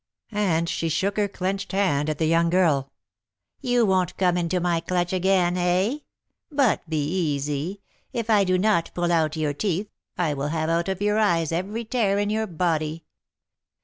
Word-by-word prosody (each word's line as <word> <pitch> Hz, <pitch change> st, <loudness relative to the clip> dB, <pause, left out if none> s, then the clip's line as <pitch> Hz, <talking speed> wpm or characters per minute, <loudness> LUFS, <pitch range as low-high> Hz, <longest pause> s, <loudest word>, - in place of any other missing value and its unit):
and 180 Hz, -6 st, +1 dB
she 165 Hz, 0 st, -1 dB
shook 195 Hz, +5 st, 0 dB
her 210 Hz, -1 st, +1 dB
clenched 195 Hz, +1 st, -3 dB
hand 155 Hz, -7 st, +1 dB
at 155 Hz, -, -2 dB
the 160 Hz, -, 0 dB
young 165 Hz, +1 st, +3 dB
girl. 155 Hz, -7 st, +2 dB, 0.7 s
"You 245 Hz, -3 st, +2 dB
won't 185 Hz, -3 st, +1 dB
come 180 Hz, -2 st, +2 dB
into 175 Hz, +1 st, 0 dB
my 175 Hz, -1 st, +1 dB
clutch 175 Hz, +1 st, -1 dB
again, 185 Hz, -1 st, +2 dB
eh? 185 Hz, +9 st, +1 dB, 0.5 s
But 270 Hz, -, +1 dB
be 155 Hz, -3 st, 0 dB, 0.3 s
easy; 145 Hz, +7 st, -3 dB, 0.3 s
if 230 Hz, -2 st, -3 dB
I 210 Hz, -3 st, +4 dB
do 185 Hz, -1 st, +2 dB
not 185 Hz, -3 st, +2 dB
pull 175 Hz, 0 st, 0 dB
out 160 Hz, -2 st, +2 dB
your 155 Hz, -2 st, -1 dB
teeth, 195 Hz, +5 st, -2 dB, 0.3 s
I 165 Hz, -4 st, +1 dB
will 140 Hz, 0 st, -2 dB
have 160 Hz, +1 st, -1 dB
out 170 Hz, +2 st, 0 dB
of 190 Hz, +1 st, -2 dB
your 210 Hz, +1 st, +2 dB
eyes 170 Hz, -7 st, +2 dB
every 200 Hz, +7 st, -3 dB
tear 215 Hz, -4 st, +1 dB
in 205 Hz, 0 st, 0 dB
your 220 Hz, 0 st, 0 dB
body. 160 Hz, -2 st, -1 dB
180 Hz, 180 wpm, -24 LUFS, 165-200 Hz, 0.7 s, I